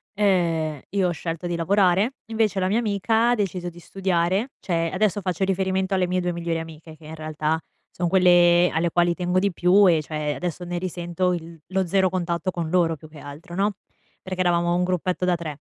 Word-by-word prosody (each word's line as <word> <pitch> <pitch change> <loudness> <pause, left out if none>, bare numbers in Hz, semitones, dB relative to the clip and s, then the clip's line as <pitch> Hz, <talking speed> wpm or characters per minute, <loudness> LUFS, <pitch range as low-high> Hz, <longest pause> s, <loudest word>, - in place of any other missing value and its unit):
ehm, 165 -7 +1
io 190 -1 +1
ho - - -1
scelto 165 +1 -5
di 175 - -2
lavorare, 195 - +2
invece 220 -3 0
la 185 - +1
mia 220 +4 +2
amica 225 +2 +1
ha - - +3
deciso 185 -4 -2
di 175 0 -14
studiare. 190 +5 0
Cioè 165 -2 -1
adesso 205 +1 0
faccio 185 0 -2
riferimento 190 0 0
alle 185 -1 +2
mie 180 0 0
2 175 0 -1
migliori 170 -1 -2
amiche 160 0 -10
che 155 0 -17
in 160 +1 -8
realtà, 155 0 -2 0.3
son 175 -1 -2
quelle 175 -1 +5
alle 165 +1 0
quali 175 0 +2
tengo 180 0 0
di 200 0 +1
più 185 +3 +4
e 160 -2 +3
cioè 150 -1 -3
adesso 180 0 -4
ne 175 0 -3
risento 180 0 -2
il 165 -1 -7
lo 190 0 0
0 190 +1 +2
contatto 180 0 -2
con 170 -2 -4
loro, 170 -2 +2
più 155 +1 -14
che 155 - -13
altro, 145 +5 -10
no, 200 +2 +1 0.5
perché 185 -1 -6
eravamo 175 -1 +2
un 180 - +1
gruppetto 180 0 -1
da 180 -1 +2
3. 155 -4 -6
175 Hz, 205 wpm, -24 LUFS, 165-190 Hz, 0.5 s, quelle